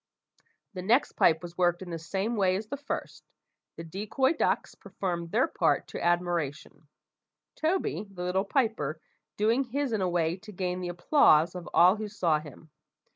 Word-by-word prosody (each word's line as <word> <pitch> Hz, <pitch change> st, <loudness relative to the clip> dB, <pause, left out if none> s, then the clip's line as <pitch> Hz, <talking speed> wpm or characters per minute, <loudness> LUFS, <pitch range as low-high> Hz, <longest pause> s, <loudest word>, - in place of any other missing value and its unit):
The 185 Hz, -, -5 dB
next 230 Hz, +9 st, +2 dB
pipe 160 Hz, +1 st, +3 dB
was 175 Hz, +1 st, -9 dB
worked 175 Hz, 0 st, +2 dB
in 180 Hz, -, -9 dB
the 165 Hz, -, -4 dB
same 195 Hz, +8 st, -2 dB
way 190 Hz, -3 st, +2 dB
as 205 Hz, +3 st, -3 dB
the 255 Hz, -, -5 dB
first. 285 Hz, +1 st, -6 dB, 0.5 s
The 165 Hz, -, -7 dB
decoy 215 Hz, -, 0 dB
ducks 315 Hz, -, 0 dB
performed 170 Hz, -3 st, -4 dB
their 240 Hz, -, +2 dB
part -, -, 0 dB
to -, -, -6 dB
admiration; 175 Hz, -4 st, -1 dB, 0.7 s
Toby, 315 Hz, -, -1 dB
the 180 Hz, -2 st, -7 dB
little 180 Hz, +2 st, 0 dB
piper, 210 Hz, -, 0 dB, 0.4 s
doing 225 Hz, +6 st, +2 dB
his 270 Hz, 0 st, -2 dB
in 215 Hz, -, 0 dB
a 185 Hz, -, +1 dB
way 170 Hz, 0 st, 0 dB
to 210 Hz, +3 st, -12 dB
gain 180 Hz, -1 st, -3 dB
the 180 Hz, -, -3 dB
applause 175 Hz, -, +4 dB
of 180 Hz, -2 st, -7 dB
all 180 Hz, +4 st, +6 dB
who 215 Hz, 0 st, -4 dB
saw 175 Hz, -7 st, +1 dB
him. 155 Hz, +1 st, -13 dB
185 Hz, 175 wpm, -28 LUFS, 170-220 Hz, 0.7 s, all